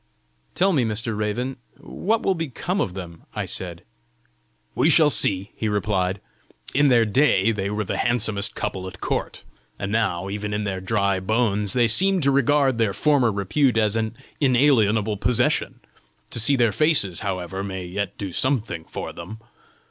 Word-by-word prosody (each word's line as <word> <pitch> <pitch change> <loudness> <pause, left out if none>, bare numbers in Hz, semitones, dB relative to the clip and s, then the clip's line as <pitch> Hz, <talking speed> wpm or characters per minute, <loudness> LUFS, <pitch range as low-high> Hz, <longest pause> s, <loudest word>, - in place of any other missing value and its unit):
"Tell 190 +1 +2
me, 135 -6 +2
Mr. 115 0 -1
Raven, 120 +6 -3 0.2
what 220 +4 -2
will 195 - +2
become 165 +3 -3
of 90 - -3
them," 85 -3 -8
I - - -2
said. 85 -2 -5 0.9
"We 160 - +2
shall 155 -1 +5
see," 100 -4 +3
he 110 - -2
replied. 100 -2 -1 0.5
"In 145 +1 +4
their 120 -4 +4
day 115 -3 +3
they 100 -2 -3
were 105 +1 -2
the 95 - -3
handsomest 110 -4 0
couple 95 -1 -4
at 95 -2 -10
court; - - -3 0.3
and 100 - -4
now, 95 -5 0
even 105 +1 -4
in 105 - -2
their 95 -2 -3
dry 100 -1 0
bones, 105 0 +1
they 120 -2 +3
seem 190 - +4
to 140 -1 +3
regard 140 -2 +2
their 110 -3 +1
former 135 0 +2
repute 110 +6 +1
as 110 -1 +2
an 110 0 -2 0.2
inalienable 115 -6 +3
possession; 120 +3 +1 0.5
to - - -2
see 125 +6 +3
their 120 -4 +2
faces, 140 - +1
however, 95 -2 -4
may 95 -2 -5
yet 100 +2 -4
do 100 -2 -5
something 110 - -1
for - - -7
them! 90 +6 -9
110 Hz, 165 wpm, -23 LUFS, 100-130 Hz, 0.9 s, shall